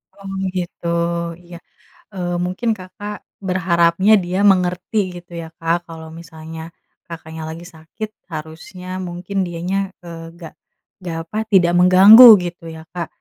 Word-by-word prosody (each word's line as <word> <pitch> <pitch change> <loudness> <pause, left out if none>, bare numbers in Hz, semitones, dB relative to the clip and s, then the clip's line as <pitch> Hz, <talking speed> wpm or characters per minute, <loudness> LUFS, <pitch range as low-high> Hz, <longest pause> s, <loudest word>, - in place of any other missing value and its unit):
Oh 195 -1 -10 0.2
gitu, 175 -1 -5 0.6
iya. 175 0 -11 0.6
Eee, 175 -2 -3
mungkin 185 +6 -3
Kakak, 205 +3 -8 0.3
berharapnya 175 +1 +2
dia 180 +2 -3
mengerti 180 +2 -1 0.2
gitu 175 0 -23
ya 165 - -8
Kak. 165 +1 +1
Kalau 160 -1 -10
misalnya 160 -1 -10 0.5
Kakaknya 160 -1 -9
lagi 165 +2 -8
sakit, 160 +7 -8 0.2
harusnya 160 +4 -9 0.2
mungkin 180 +3 -6
dianya, 175 +3 -3 0.3
eee, 165 -1 -9 0.2
gak 165 - -10 0.5
gak 165 -2 -4
apa, 215 - -5 0.2
tidak 175 -3 +5
mengganggu 190 +7 +9 0.2
gitu 175 0 -7
ya 160 - -10
Kak, 175 -2 -4
175 Hz, 130 wpm, -19 LUFS, 165-185 Hz, 0.6 s, mengganggu